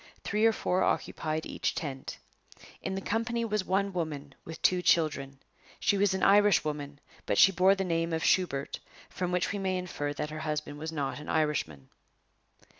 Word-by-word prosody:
Three 215 +2 +2
or - - +5
four 185 -3 0
occupied 155 -3 -1
each - - -2
tent. 135 -5 -5 0.6
In 190 - -3
the 195 - -3
company 230 +3 -1
was 210 -3 -1
one 195 +1 0
woman, 150 -5 -4
with 160 0 -8
two 180 -1 +4
children. 145 -6 +1 0.4
She - - +2
was 200 -1 +2
an 190 - -2
Irishwoman; 155 -8 +3 0.3
but - - +1
she 195 - +8
bore 190 +2 +4
the 195 - -1
name 165 -2 -1
of 160 0 -1
Shubert, 140 -7 +1 0.3
from 180 -1 -3
which 180 0 0
we 200 - -3
may 190 -1 0
infer 170 -5 -3
that 150 +1 -4
her 155 - -5
husband 150 -1 -3
was 160 +1 -4
not 145 -3 -3
an 150 - -9
Irishman. 150 - -1
165 Hz, 180 wpm, -29 LUFS, 150-195 Hz, 0.6 s, she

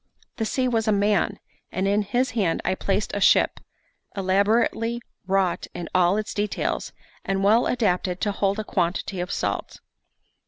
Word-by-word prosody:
The 225 - -1
sea 255 +3 0
was 225 -2 0
a - - +4
man, 205 -1 +2 0.3
and 190 +2 -1
in 205 +1 +2
his 245 +6 0
hand 200 -8 0
I 185 - +2
placed 195 +2 -1
a 205 - -2
ship, - - +4 0.6
elaborately 220 +4 +1 0.3
wrought 190 -2 +1
in 175 -2 -5
all 185 +2 +4
its 215 - -3
details, 205 -1 -2 0.3
and 195 0 -1
well 220 +4 +4
adapted 185 -6 0
to 205 - +1
hold 200 0 0
a 215 - -2
quantity 185 0 -1
of 180 +1 -3
salt. - - -3
200 Hz, 160 wpm, -24 LUFS, 185-215 Hz, 0.6 s, a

